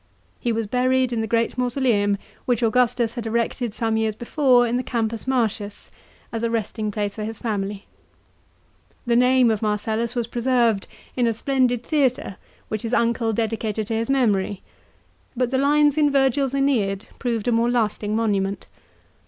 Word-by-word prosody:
He 240 Hz, -, -1 dB
was 225 Hz, 0 st, -1 dB
buried 255 Hz, +2 st, +1 dB
in 225 Hz, -, 0 dB
the 220 Hz, -, -2 dB
great 230 Hz, +3 st, 0 dB
mausoleum 240 Hz, -5 st, +1 dB, 0.3 s
which 245 Hz, -2 st, +1 dB
Augustus 235 Hz, 0 st, +2 dB
had 235 Hz, -3 st, -5 dB
erected 235 Hz, +1 st, -1 dB
some 225 Hz, +1 st, -1 dB
years 220 Hz, -1 st, 0 dB
before 245 Hz, +1 st, +3 dB
in 235 Hz, 0 st, -1 dB
the 250 Hz, -, +1 dB
Campus 230 Hz, -1 st, -3 dB
Martius, 220 Hz, -5 st, -2 dB, 0.4 s
as 225 Hz, -, -3 dB
a 230 Hz, -, 0 dB
resting 220 Hz, -1 st, -2 dB
place 205 Hz, -1 st, -2 dB
for 215 Hz, -, -5 dB
his 220 Hz, +1 st, -5 dB
family. 205 Hz, -3 st, -3 dB, 1.2 s
The 235 Hz, -1 st, +2 dB
name 250 Hz, -1 st, +4 dB
of 215 Hz, -, -1 dB
Marcellus 220 Hz, +3 st, -1 dB
was 240 Hz, -1 st, 0 dB
preserved 235 Hz, -3 st, +1 dB, 0.3 s
in 245 Hz, -2 st, +2 dB
a 230 Hz, -, +1 dB
splendid 245 Hz, 0 st, 0 dB
theatre 255 Hz, -, 0 dB, 0.3 s
which 215 Hz, -1 st, -3 dB
his 230 Hz, +1 st, -1 dB
uncle 230 Hz, -1 st, +1 dB
dedicated 220 Hz, -1 st, -2 dB
to -, -, -1 dB
his 225 Hz, +2 st, -2 dB
memory; 205 Hz, -7 st, +1 dB, 0.7 s
but 250 Hz, 0 st, 0 dB
the 260 Hz, -, +1 dB
lines 295 Hz, +1 st, +3 dB
in 295 Hz, -1 st, +4 dB
Virgil's 270 Hz, -1 st, +2 dB
/Eneid* 225 Hz, -8 st, +1 dB, 0.2 s
proved 235 Hz, -3 st, -2 dB
a -, -, +3 dB
more 230 Hz, +1 st, +2 dB
lasting 215 Hz, -3 st, 0 dB
monument. 200 Hz, -3 st, 0 dB
230 Hz, 165 wpm, -23 LUFS, 215-250 Hz, 1.2 s, name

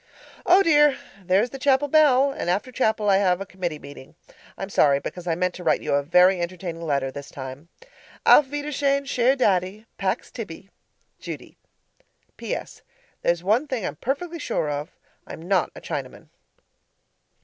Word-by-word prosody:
Oh, 375 Hz, +3 st, +6 dB
dear! 295 Hz, -4 st, +4 dB, 0.3 s
There's 195 Hz, +6 st, +2 dB
the 270 Hz, -, -8 dB
chapel 275 Hz, +1 st, +2 dB
bell, 280 Hz, -2 st, +4 dB
and 275 Hz, -, -4 dB
after 200 Hz, +8 st, -1 dB
chapel 220 Hz, -4 st, 0 dB
I 195 Hz, -1 st, +5 dB
have 185 Hz, -2 st, +2 dB
a 195 Hz, -, -5 dB
committee 180 Hz, -5 st, -4 dB
meeting. 140 Hz, 0 st, -13 dB, 0.4 s
I'm 195 Hz, +1 st, -6 dB
sorry 140 Hz, -5 st, +4 dB
because 180 Hz, +4 st, -7 dB
I 165 Hz, -, +1 dB
meant 180 Hz, +1 st, -1 dB
to 180 Hz, -, -9 dB
write -, -, +1 dB
you -, -, -1 dB
a 140 Hz, -, +3 dB
very 180 Hz, +5 st, +4 dB
entertaining 170 Hz, -1 st, -5 dB
letter 140 Hz, -4 st, -1 dB
this 140 Hz, 0 st, -9 dB
time. 130 Hz, +4 st, -9 dB, 0.6 s
Auf 295 Hz, -, +7 dB
wiedersehen 285 Hz, -1 st, -1 dB
Cher 255 Hz, -1 st, +2 dB
Daddy, 200 Hz, -3 st, 0 dB
Pax 190 Hz, -1 st, -2 dB
tibi! 195 Hz, -4 st, -9 dB, 0.5 s
Judy -, -, -8 dB, 0.8 s
PS. -, -, -6 dB, 0.4 s
There's 170 Hz, 0 st, 0 dB
one 225 Hz, +10 st, +2 dB
thing 250 Hz, -8 st, -3 dB
I'm -, -, -4 dB
perfectly 330 Hz, -, -3 dB
sure 190 Hz, -, -2 dB
of 145 Hz, +3 st, -4 dB, 0.4 s
I'm 160 Hz, -, -9 dB
not 190 Hz, -3 st, +2 dB
a -, -, -10 dB
Chinaman. -, -, -6 dB
195 Hz, 160 wpm, -24 LUFS, 170-265 Hz, 0.8 s, Auf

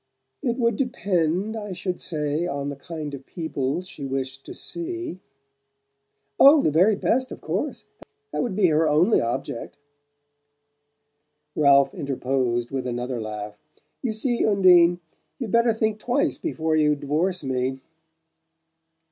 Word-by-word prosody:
"It 240 Hz, -3 st, -1 dB
would 235 Hz, -4 st, +1 dB
depend, 200 Hz, -, 0 dB
I 205 Hz, -3 st, -5 dB
should 180 Hz, 0 st, -4 dB
say, 150 Hz, +1 st, -1 dB
on 140 Hz, -3 st, -3 dB
the 145 Hz, -, -5 dB
kind 150 Hz, 0 st, -7 dB
of 135 Hz, -1 st, -7 dB
people 160 Hz, -2 st, -3 dB
she 170 Hz, -5 st, -10 dB
wished 135 Hz, 0 st, -4 dB
to -, -, -7 dB
see." 345 Hz, -, -5 dB, 1.2 s
"Oh, 285 Hz, +1 st, +8 dB
the -, -, +2 dB
very 185 Hz, +8 st, +4 dB
best, 255 Hz, +6 st, 0 dB
of -, -, -7 dB
course! -, -, -3 dB, 0.5 s
That -, -, -1 dB
would 235 Hz, -7 st, -2 dB
be 205 Hz, -1 st, +3 dB
her 155 Hz, 0 st, +3 dB
only 165 Hz, +9 st, +4 dB
object." 120 Hz, +3 st, -4 dB, 1.8 s
Ralph 140 Hz, -2 st, +5 dB
interposed 130 Hz, -3 st, -1 dB
with 130 Hz, -2 st, -3 dB
another 120 Hz, 0 st, -3 dB
laugh. 105 Hz, -1 st, -6 dB, 0.4 s
"You 245 Hz, -, -1 dB
see, 235 Hz, +2 st, 0 dB
Undine, 180 Hz, -4 st, +5 dB, 0.4 s
you'd 235 Hz, -6 st, -5 dB
better 235 Hz, 0 st, +4 dB
think 220 Hz, -1 st, -1 dB
twice 250 Hz, +5 st, 0 dB
before 160 Hz, -, -1 dB
you 150 Hz, -1 st, +3 dB
divorce 155 Hz, +5 st, -1 dB
me!" 130 Hz, 0 st, -1 dB
165 Hz, 135 wpm, -24 LUFS, 135-215 Hz, 1.8 s, Oh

